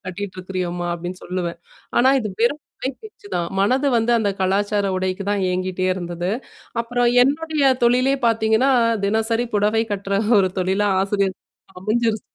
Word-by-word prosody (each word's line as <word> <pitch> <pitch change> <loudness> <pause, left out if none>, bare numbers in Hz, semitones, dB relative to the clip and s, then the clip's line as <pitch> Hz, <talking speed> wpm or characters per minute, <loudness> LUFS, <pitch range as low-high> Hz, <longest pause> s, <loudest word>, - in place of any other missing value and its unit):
கட்டிட்டு 185 +1 -6
இருக்கிறியோம்மா! 180 -1 -3
அப்பிடின்னு 175 +2 -6
சொல்லுவேன். 175 -2 -3 0.4
ஆனா, 260 +2 +5
இது 215 - -3
வெறும் 285 +6 +2 0.2
குறை 265 - -3
பேச்சுதான். 405 - -5
மனது 255 +8 +2
வந்து 230 +2 +1
அந்தக் 200 -3 -1
கலாச்சார 205 +2 +1
உடைக்கு 185 +1 -2
தான் 200 -2 0
ஏங்கிட்டே 185 0 -1
இருந்தது. 175 0 -4 0.5
அப்புறம் 245 +1 +1 0.2
என்னுடைய 300 +2 0 0.2
தொழிலே 255 +3 +3
பார்த்தீங்கன்னா, 225 +3 +3 0.4
தினசரி 225 +3 0
புடவை 215 +2 +2
கட்டுற 200 0 -1 0.2
ஒரு 185 - +1
தொழிலா 190 +3 +1
ஆசிரியர் 195 -1 0
தொழில் 190 - -30
அமைஞ்சிருச்சு. 220 +1 0
205 Hz, 140 wpm, -21 LUFS, 185-235 Hz, 0.5 s, ஆனா